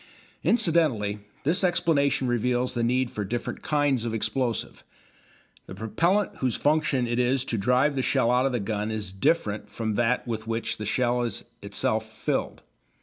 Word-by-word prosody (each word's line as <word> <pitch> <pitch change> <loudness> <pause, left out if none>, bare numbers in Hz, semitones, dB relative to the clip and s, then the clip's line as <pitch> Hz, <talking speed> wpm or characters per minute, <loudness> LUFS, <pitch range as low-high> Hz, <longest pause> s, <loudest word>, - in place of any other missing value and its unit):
Incidentally 150 - +2 0.2
this 175 +7 +2
explanation 145 -7 +2
reveals 125 +1 0
the 120 - -1
need 125 +1 +1
for 105 - -3
different 115 +5 -4
kinds 145 -5 +1
of 115 -1 -2
explosive. 120 +1 -2 0.8
The 95 - -8
propellant 170 - 0
whose 125 -4 0
function 150 -4 +1
it 120 +1 -1
is 125 +1 +1
to 115 - -2
drive 125 +7 +3
the 130 - +1
shell 130 -2 +2
out 125 +2 +3
of - - -1
the 120 - -1
gun 105 +1 -2
is 105 -3 -3
different 105 - 0
from 110 -2 -3
that 120 +1 +1
with 110 -1 -4
which 115 0 -2
the 105 - -5
shell 125 +1 +1
is 120 -1 -3 0.2
itself 110 +2 -1
filled. - - -3
120 Hz, 165 wpm, -26 LUFS, 110-135 Hz, 0.8 s, drive